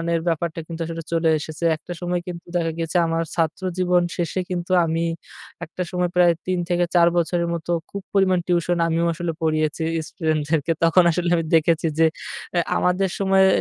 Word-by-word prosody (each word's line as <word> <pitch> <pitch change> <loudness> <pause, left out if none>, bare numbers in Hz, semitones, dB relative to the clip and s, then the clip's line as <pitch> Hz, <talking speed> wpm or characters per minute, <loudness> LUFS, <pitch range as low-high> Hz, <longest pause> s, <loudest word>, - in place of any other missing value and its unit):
এর 165 - 0
ব্যাপারটা 165 +1 -2
কিন্তু 165 0 -6
আসলে 165 -1 -5
চলে 165 -1 +2
এসেছে। 155 +2 -5
একটা 165 - -11
সময় 175 0 -1
কিন্তু 175 -1 -7
দেখা 165 -1 0
গেছে 165 +1 -1
আমার 165 0 0
ছাত্র 165 +2 0 0.2
জীবন 180 -1 +3 0.2
শেষে 175 +2 -1
কিন্তু 180 0 -3
আমি 165 +1 -1 0.6
একটা 180 +3 -7
সময় 180 -1 0
প্রায় 175 -1 +5
৩ 185 -1 0
থেকে 175 0 +2
৪ 170 -1 +6
বছরের 170 +1 +1
মতো 170 +1 -4 0.2
খুব 200 - -6
পরিমাণ 190 -2 +3
টিউশন 175 0 +1
আমিও 165 +1 +1
আসলে 170 0 -3
পড়িয়েছি 155 0 0 0.2
ইস্টুডেন্টদেরকে। 155 -1 -1
তখন 170 +2 +5
আসলে 175 +1 -1
আমি 165 -1 -1
দেখেছি 165 +1 +2
যে 165 - +6 0.7
আমাদের 180 +1 +1
সময়ে 190 -1 +4
170 Hz, 170 wpm, -22 LUFS, 165-180 Hz, 0.7 s, ৪